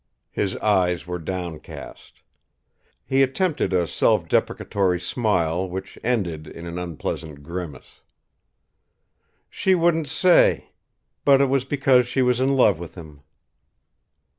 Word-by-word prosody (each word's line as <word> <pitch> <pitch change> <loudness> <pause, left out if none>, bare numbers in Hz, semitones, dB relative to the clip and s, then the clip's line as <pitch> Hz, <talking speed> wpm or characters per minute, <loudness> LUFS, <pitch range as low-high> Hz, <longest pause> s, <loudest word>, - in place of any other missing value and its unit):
His 95 -2 -2
eyes 90 -5 +1
were 90 0 -4
downcast. 85 -2 -8 0.8
He 135 +1 +2
attempted 135 - 0
a 90 -2 +2
self - - +1
deprecatory 95 -3 0
smile 90 -5 0
which 95 +1 -7
ended 90 -10 -1
in 85 - -10
an 85 +1 -5
unpleasant 80 -3 -5
grimace. 85 -1 -8 1.5
"She 190 -1 +1
wouldn't 165 -3 +1
say. 175 +5 +3 0.5
But 140 -1 +5
it 140 -1 +3
was 135 -1 +1
because 135 -3 +3
she 130 +1 +1
was 125 -1 +2
in 135 +1 +2
love 105 -9 +4
with 85 -2 -9
him." 80 -5 -11
95 Hz, 120 wpm, -23 LUFS, 85-135 Hz, 1.5 s, But